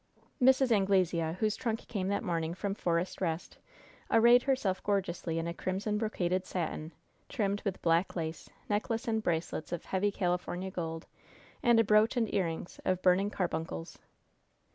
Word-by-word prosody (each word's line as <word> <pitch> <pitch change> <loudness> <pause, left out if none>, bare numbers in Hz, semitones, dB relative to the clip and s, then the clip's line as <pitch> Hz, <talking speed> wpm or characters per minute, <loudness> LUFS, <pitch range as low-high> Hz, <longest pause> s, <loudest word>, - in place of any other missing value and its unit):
Mrs. 265 0 +5
Anglesea, 185 -5 +2
whose 215 -1 +1
trunk 225 -2 -3
came 195 -5 -2
that 200 +3 0
morning 165 -4 -1
from 200 +1 -2
Forest 175 -2 -1
Rest, 165 -2 -3 0.5
arrayed 235 +2 +6
herself 245 -9 0
gorgeously 185 -5 -1
in 165 - -1
a 170 - -3
crimson 195 +4 -2
brocaded 185 -4 -1
satin, 160 -2 -3 0.4
trimmed 205 -5 -1
with 195 -3 -2
black 170 +2 +2
lace, 160 -2 -4 0.2
necklace 220 +2 -1
and 220 -1 +1
bracelets 165 -4 -2
of 175 - -4
heavy 195 +2 0
California 180 0 -2
gold, 165 -2 -4 0.6
and 235 -1 +5
a - - +6
brooch 215 +3 +4
and 225 -3 0
earrings 170 -3 -2
of 185 0 0
burning 185 +2 +4
carbuncles. 160 - -3
190 Hz, 150 wpm, -31 LUFS, 170-215 Hz, 0.6 s, arrayed